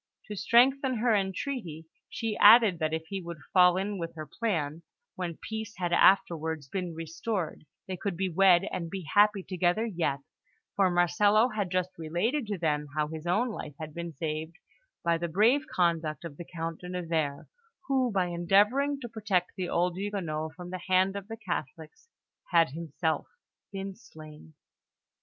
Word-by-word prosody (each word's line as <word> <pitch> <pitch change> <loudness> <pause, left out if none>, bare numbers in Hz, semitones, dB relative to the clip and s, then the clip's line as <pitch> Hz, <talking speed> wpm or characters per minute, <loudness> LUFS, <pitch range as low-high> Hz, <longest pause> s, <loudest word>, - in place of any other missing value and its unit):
To 210 - -4
strengthen 255 +6 +3
her 230 0 +2
entreaty, 190 - -3 0.2
she 225 -2 -3
added 210 -4 +7
that 155 -1 0
if 160 0 -3
he 195 -1 -3
would 170 -1 -7 0.2
fall 180 -1 +6
in 200 +1 -2
with 165 -1 -5
her 155 -1 -6
plan, 160 - -2 0.3
when 175 -3 -5
peace 220 0 -6
had 175 -2 -1
afterwards 160 -5 +3
been 180 +2 -4
restored, 165 0 -4 0.2
they 185 -1 -4
could 195 -2 -3
be 190 +1 0
wed 185 0 +5
and 170 -2 -4
be 190 +1 -5
happy 205 +3 +3
together 180 +4 0
yet; 170 - -1 0.5
for 195 -2 +3
Marcello 205 +6 +3
had 210 -5 -2
just 185 0 -1
related 205 - -1
to 205 -2 -2
them 150 -3 -1
how 150 -1 0
his 160 +1 -7
own 215 +8 +2
life 150 -9 -7
had 155 -1 -7
been 170 +1 -5
saved 155 +2 -4 0.5
by 170 -1 +2
the 170 - -2
brave 230 - +3
conduct 165 -3 0
of 155 -4 -7
the 175 - -7
Count 165 -1 -5
de 180 - -8
Nevers, 165 -5 -2 0.4
who, 260 -3 +1
by 190 -3 +1
endeavouring 205 +12 +2
to 240 - -5
protect 205 -6 -1
the 185 -2 -3
old 175 0 +1
Huguenot 165 -6 -3
from 180 0 -9
the 185 -1 -5
hand 185 +1 +3
of 200 -1 -6
the 225 0 -7
Catholics, 170 - -6 0.4
had 165 -5 +4
himself 160 0 -2 0.4
been 195 0 -5
slain. 155 - -14
180 Hz, 170 wpm, -29 LUFS, 165-205 Hz, 0.5 s, added